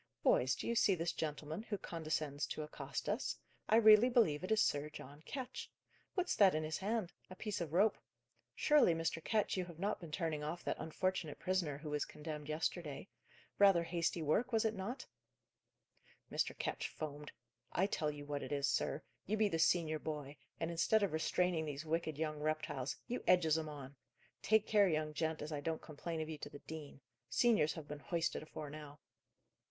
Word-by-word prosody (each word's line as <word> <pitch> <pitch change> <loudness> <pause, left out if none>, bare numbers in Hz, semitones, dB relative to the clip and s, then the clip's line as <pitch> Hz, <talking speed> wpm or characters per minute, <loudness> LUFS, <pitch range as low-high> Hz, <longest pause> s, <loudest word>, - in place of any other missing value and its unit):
"Boys, 125 0 +4
do - - -6
you 235 - +1
see 215 -4 +4
this 165 0 -1
gentleman 155 +3 -3
who 220 -2 -3
condescends 155 -4 -2
to 155 - -4
accost 150 - -5
us? - - -1 0.3
I - - +6
really 220 +1 +8
believe 185 -11 +3
it 185 - -3
is 220 - +4
Sir 145 -7 +2
John 145 0 -10
Ketch. 260 -2 -5 0.5
What's 365 -2 +1
that 195 -5 +6
in 155 - 0
his 155 0 -2
hand? 205 -2 -1 0.2
a 185 - -9
piece 210 -1 -3
of 165 -3 -3
rope? 200 +6 +3 0.6
Surely, 295 - +5
Mr. 165 0 -1
Ketch, 215 -3 +1
you 185 - 0
have 170 -2 -11
not 200 +4 -1
been 165 -3 -8
turning 155 -3 -1
off 170 +4 -4
that - - -2
unfortunate 175 -1 -2
prisoner 180 -6 0
who 150 0 -6
was 150 0 +1
condemned 150 -1 -7
yesterday? 155 +1 -2 0.5
Rather 195 -4 +7
hasty 170 -1 -1
work, 155 +11 +2
sir; - - -19
was 225 0 +3
it 220 - +2
not?" 220 +6 -4 1.3
Mr. - - 0
Ketch - - -2
foamed. 150 -1 -6 0.4
"I 185 - +2
tell 155 -6 0
you 145 -1 -6
what 145 -1 -3
it - - -6
is, 140 -1 +1
sir. 140 - 0 0.2
You 215 +3 +1
be 215 -1 +3
the 165 - -1
senior 160 -1 +3
boy, 150 -2 -5 0.2
and, 165 +1 -1
instead 205 +6 +3
of 195 - 0
restraining 165 +1 +1
these 145 0 -5
wicked 160 -1 -1
young 155 -1 -2
reptiles, 150 -3 -2
you 245 - -3
edges 165 -4 +5
'em 160 -1 -2
on! 140 -2 -8 0.5
Take 220 0 +4
care, 205 -2 +5
young 155 -1 0
gent, 160 0 -1
as 150 - -5
I 145 -1 -2
don't 160 +2 -1
complain 160 +1 -5
of 155 - -3
you 155 -2 -6
to 145 - -6
the 145 - -9
dean. 145 -2 -9 0.3
Seniors 215 -11 +4
have 155 -3 -8
been 150 0 -6
hoisted 170 +2 -1
afore 155 -1 -7
now." 150 -1 -9
160 Hz, 195 wpm, -37 LUFS, 150-190 Hz, 1.3 s, really